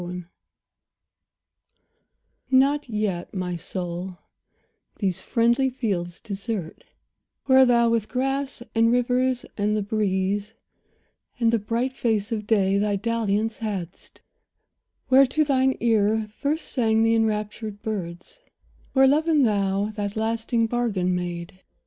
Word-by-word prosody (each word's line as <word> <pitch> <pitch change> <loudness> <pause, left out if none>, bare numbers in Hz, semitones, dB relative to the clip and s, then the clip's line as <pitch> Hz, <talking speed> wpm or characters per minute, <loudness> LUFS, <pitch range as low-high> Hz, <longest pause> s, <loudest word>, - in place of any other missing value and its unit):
XXIV 175 0 -6 2.2
NOT 275 +1 +3
yet, 210 -5 -2
my 180 -1 -2
soul, 175 +1 -5 0.8
these 190 -4 -2
friendly 235 +3 +2
fields 190 -9 -3
desert, 200 -4 -5 0.6
Where 260 -1 +6
thou 235 -1 +4
with 225 -2 0
grass, 270 0 -2
and 230 0 +3
rivers, 250 +1 +1
and 210 +1 +1
the 210 - -1
breeze, 205 0 -1 0.8
And 230 -1 +2
the 230 - +3
bright 235 +5 -2
face 220 -3 -1
of 210 -2 -3
day, 200 -3 +2
thy 205 0 +1
dalliance 220 0 -1
hadst; 195 -6 -6 0.9
Where 265 +1 +6
to 310 +5 +1
thine 265 -2 +2
ear 220 -1 +2
first 300 +3 -2
sang 225 -3 +2
the 225 0 +3
enraptured 215 -1 -2
birds; 190 - -6 0.5
Where 270 0 +5
love 300 +4 +3
and 300 -5 +4
thou 200 -1 0
that 205 -1 -3
lasting 225 +1 0
bargain 220 -6 0
made. 175 0 -5
220 Hz, 120 wpm, -24 LUFS, 195-245 Hz, 2.2 s, Where